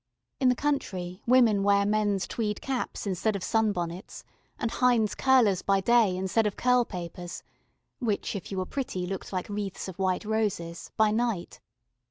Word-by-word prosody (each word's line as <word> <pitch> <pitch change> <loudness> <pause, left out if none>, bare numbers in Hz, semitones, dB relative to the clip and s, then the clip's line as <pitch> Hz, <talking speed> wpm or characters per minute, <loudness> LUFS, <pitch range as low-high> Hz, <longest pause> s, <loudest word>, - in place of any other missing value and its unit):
In 260 - +4
the 250 - +3
country 195 -10 -2
women 235 -5 +5
wear 200 0 +3
men's 205 -2 +1
tweed 210 -3 -2
caps 265 -4 -3
instead 200 +2 0
of 195 - -4
sunbonnets, 190 -4 -1 0.3
and 230 - -2
Hinde's 240 -4 +2
curlers 240 -8 +3
by 195 0 +2
day 215 -2 +3
instead 190 +4 +1
of 205 - -4
curl 250 -1 +3
papers 175 -2 -7 0.6
(which 220 -4 -1
if 195 - -6
you 195 - -3
were 185 - -1
pretty, 190 -7 -3
looked 190 +1 -5
like 185 -2 -3
wreaths 205 -2 -4
of 190 -1 -9
white 190 +2 0
roses) 205 -6 -2
by 220 -1 +4
night. 225 -5 -1
205 Hz, 165 wpm, -28 LUFS, 185-230 Hz, 0.6 s, women